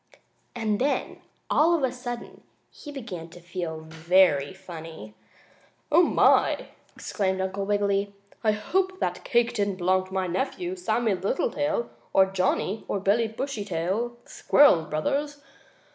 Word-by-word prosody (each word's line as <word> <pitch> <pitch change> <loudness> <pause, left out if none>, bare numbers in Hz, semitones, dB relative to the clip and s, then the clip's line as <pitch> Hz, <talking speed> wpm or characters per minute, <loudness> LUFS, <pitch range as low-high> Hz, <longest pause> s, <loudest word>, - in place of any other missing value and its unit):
And 215 -3 -1
then, 285 +2 -1 0.3
all 335 +3 +4
of 310 - -1
a 260 - +2
sudden, 245 -1 -7 0.3
he 295 - -10
began 190 - -7
to 175 - -13
feel 170 -2 -5
very 160 -2 +3
funny. 165 - -10 0.8
"Oh, - - +7
my!" - - +3 0.3
exclaimed 190 -2 -2
Uncle 195 +1 -2
Wiggily. 200 -1 +1 0.3
"I 215 -1 +3
hope 375 - -1
that - - -2
cake 240 -2 +2
didn't 200 -4 0
belong 185 +1 +1
to 190 - -13
my 190 -1 +1
nephew, 280 - -2
Sammie 240 - 0
Littletail, 235 +7 -1 0.2
or 190 - +6
Johnnie 190 +2 -1
or 200 - -1
Billie 210 +4 +2
Bushytail, 220 -2 -3
the - - -23
squirrel 230 - +5
brothers. 285 - -2
200 Hz, 135 wpm, -26 LUFS, 185-245 Hz, 0.8 s, Oh